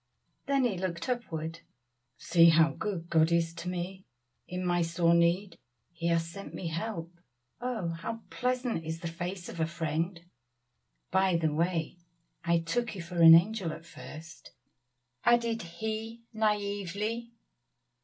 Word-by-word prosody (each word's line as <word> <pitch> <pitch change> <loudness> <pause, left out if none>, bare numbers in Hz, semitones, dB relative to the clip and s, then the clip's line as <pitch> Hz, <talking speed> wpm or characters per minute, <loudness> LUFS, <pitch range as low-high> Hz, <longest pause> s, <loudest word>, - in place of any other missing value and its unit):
Then 275 -1 +3
he 210 -8 0
looked 170 -3 -3
upward 165 -9 -3 0.6
"See 170 -1 +6
how 165 0 +5
good 185 -6 -4
God 160 0 +4
is 165 -1 +2
to 180 - -5
me! 185 +2 -5 0.4
in 180 0 -4
my 175 -1 +2
sore 170 0 +2
need 170 +2 +2 0.3
He 170 0 -3
has 165 -1 +2
sent 195 +4 -8
me 170 - -3
help. 165 0 -4 0.5
Oh! 240 -8 -2
how 175 +7 -5
pleasant 250 -7 -1
is 160 +1 -5
the 170 - -3
face 175 +2 -5
of - - -8
a 160 - +2
friend. 165 +1 -2 0.9
By 190 -1 +3
the 160 -2 +1
way, 170 +1 -1 0.4
I 170 0 +3
took 220 +7 -1
you 185 - -5
for 170 0 -2
an 165 0 +11
angel 185 0 +2
at 165 - -9
first," 160 -1 -11 0.7
added 235 -1 +3
he 220 +6 -5
naively. 210 +2 -1
175 Hz, 145 wpm, -30 LUFS, 165-210 Hz, 0.9 s, an